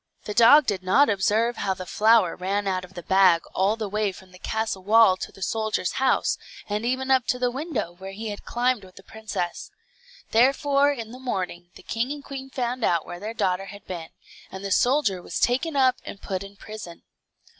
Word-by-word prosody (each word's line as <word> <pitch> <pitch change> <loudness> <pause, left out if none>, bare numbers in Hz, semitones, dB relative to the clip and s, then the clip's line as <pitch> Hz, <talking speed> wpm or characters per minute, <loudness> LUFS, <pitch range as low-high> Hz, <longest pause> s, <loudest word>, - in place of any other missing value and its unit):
The 210 - -5
dog 245 +7 +7
did 200 -5 -1
not 205 +9 +4
observe 215 +4 +1
how 190 -1 -1
the 185 - -7
flour 215 -1 +3
ran 195 +2 -2
out 185 -1 -1
of 185 +1 -13
the 175 - -7
bag 185 -2 +4
all 195 +3 +2
the 220 -2 -4
way 210 0 0
from 185 0 -15
the 180 - -15
castle 220 -3 -2
wall 215 -1 +6
to - - -6
the 195 - -8
soldier's 220 -4 -1
house, 265 - +2 0.3
and 210 +1 -2
even 260 +1 -1
up 260 -2 +3
to 250 - +1
the 250 -1 0
window, 265 - -3
where 190 +2 -10
he 220 +2 -5
had 205 - -7
climbed 245 -2 0
with 185 -1 -15
the 195 - -14
princess. 215 -5 -5 0.6
Therefore 275 +4 +3
in 230 -5 -6
the 250 - -10
morning 185 -8 -4
the - - -14
king 235 +4 -2
and 290 -1 -6
queen 270 -1 -7
found 250 -1 -3
out 170 -5 +2
where 175 - -8
their 215 +4 -6
daughter 185 -2 0
had 200 0 -11
been, 170 -3 -6 0.4
and 190 +1 -7
the 195 - -3
soldier 245 -6 +2
was - - -4
taken 285 +6 +1
up 260 -2 +4
and 200 - -8
put 190 -2 -4
in 200 0 -10
prison. 200 -5 -10
215 Hz, 210 wpm, -25 LUFS, 190-250 Hz, 0.6 s, dog